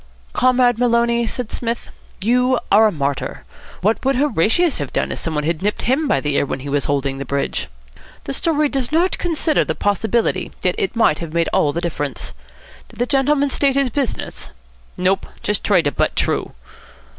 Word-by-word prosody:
"Comrade 250 -2 +3
Maloney," 235 -1 +2
said 245 0 -4
Psmith, 235 0 -3 0.3
"you 250 +4 +3
are 220 +2 +7
a - - 0
martyr. 140 - -3 0.4
What 215 +4 +1
would 270 +1 +2
Horatius 280 - +2
have 145 -3 -4
done - - -1
if - - -4
somebody 150 -2 -2
had 165 +1 -1
nipped 210 +2 -1
him 275 +6 +1
by - - +2
the 145 -1 -1
ear - - +3
when 130 - -4
he 140 - -6
was 145 0 0
holding 140 -1 -1
the - - -3
bridge? 140 +1 -2 0.6
The 135 - -4
story 305 - +2
does 270 -2 -2
not 345 +4 +2
consider 325 -2 +1
the - - -3
possibility. 220 +3 0
Yet - - +2
it 395 - -1
might 225 -10 +3
have 165 -2 -6
made 170 -1 +2
all 145 - +3
the 170 - -3
difference. 145 -6 -3 0.6
Did - - -17
the 245 - +1
gentleman 280 +2 +2
state 275 0 +2
his 275 -3 +2
business?" 275 -3 -3 0.5
"Nope. 190 +2 +1 0.2
Just 210 - -1
tried 190 -5 +3
to 145 - +1
butt - - 0
t'roo." - - 0
230 Hz, 190 wpm, -19 LUFS, 165-265 Hz, 0.6 s, are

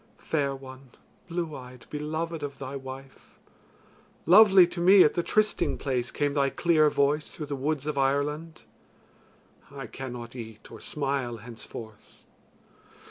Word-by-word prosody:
Fair 140 -3 -1
one, 130 0 -12 0.4
blue 170 -3 -3
eyed, 125 -1 -11
beloved 155 +2 -3
of 140 -2 -5
thy 135 +1 -6
wife; 135 0 -10 0.9
lovely 190 +1 +8
to 175 0 -7
me 185 +2 +8
at 150 - +3
the 175 - 0
trysting 215 +4 +1
place 125 -3 -2
came 145 -1 -1
thy 140 -1 +2
clear 155 0 +3
voice 145 +1 +1
through 155 - -7
the 145 -1 -4
woods 145 +1 -2
of 150 -2 -2
Ireland. 150 +4 -1 1.1
I 140 -1 -8
cannot 125 -2 -8
eat 110 -3 -10
or - - -10
smile 135 -5 -2
henceforth. 110 -1 -11
140 Hz, 135 wpm, -27 LUFS, 130-155 Hz, 1.1 s, lovely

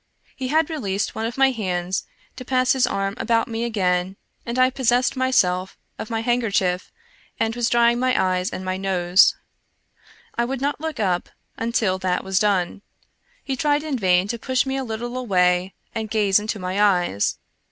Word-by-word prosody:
He 260 - -4
had 315 +4 +1
released 205 -10 -2
one 220 +1 -2
of 235 - -7
my 270 0 +5
hands 185 -5 -2 0.3
to 255 - -8
pass 255 0 +2
his 260 -2 +2
arm 195 -3 -1
about 230 -2 +1
me 230 0 -3
again, 185 -5 0 0.3
and 235 +1 -3
I 255 0 +4
possessed 250 0 +1
myself 190 -8 +1 0.2
of - - -5
my 225 -1 -1
handkerchief 205 -7 0 0.5
and 225 0 0
was 240 -1 0
drying 235 0 +3
my 255 0 +2
eyes 185 0 +1
and 185 - -6
my 185 0 -2
nose. 185 -1 +3 1.0
I 235 - 0
would 260 +2 -3
not 285 +2 -2
look 320 -5 -4
up 185 -4 0 0.3
until 225 -5 0
that 185 -1 -1
was 190 0 +1
done; 195 -2 0 0.6
he 270 - -2
tried 290 +2 +1
in 305 -3 -2
vain 185 -1 +3
to 235 - -3
push 255 +2 0
me 265 0 -2
a 270 - -2
little 240 +1 -5
away 185 -6 +1 0.2
and 220 -1 -4
gaze 205 -2 +3
into 215 +1 -3
my 185 +1 -2
eyes. 180 - +2
220 Hz, 180 wpm, -22 LUFS, 185-255 Hz, 1.0 s, my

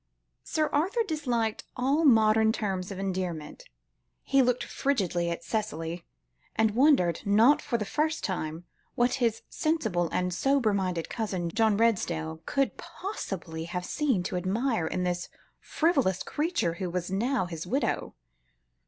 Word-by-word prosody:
Sir 310 -1 0
Arthur 380 +11 +2
disliked 245 -9 -1
all 275 +6 +2
modern 220 -4 +5
terms 195 -5 -2
of 195 - -6
endearment. 185 -5 -4 0.6
He 275 0 +3
looked 250 -1 +2
frigidly 180 -11 0
at 170 0 -4
Cicely; 170 -5 -3 0.5
and 220 -1 +3
wondered, 235 - +4
not 225 +7 +5
for 235 - -1
the 210 - -3
first 310 +7 -1
time, 165 -4 -3 0.3
what 245 +1 +2
his 230 -2 +1
sensible 220 - 0
and 180 0 0
sober 270 +1 +2
minded 185 -4 -1
cousin, 190 -7 -2
John 220 0 +3
Redesdale, 170 -8 0
could 275 -7 0
possibly 180 - -5
have 180 +1 -4
seen 265 -12 0
to 180 - -2
admire, 200 +1 0
in 180 - -2
this 175 -1 -2 0.3
frivolous 275 - +1
creature 305 - -1
who 185 - -1
was 180 +1 -3
now 230 +2 +1
his 165 -1 -6
widow. 265 +8 -1
210 Hz, 140 wpm, -28 LUFS, 180-265 Hz, 0.6 s, modern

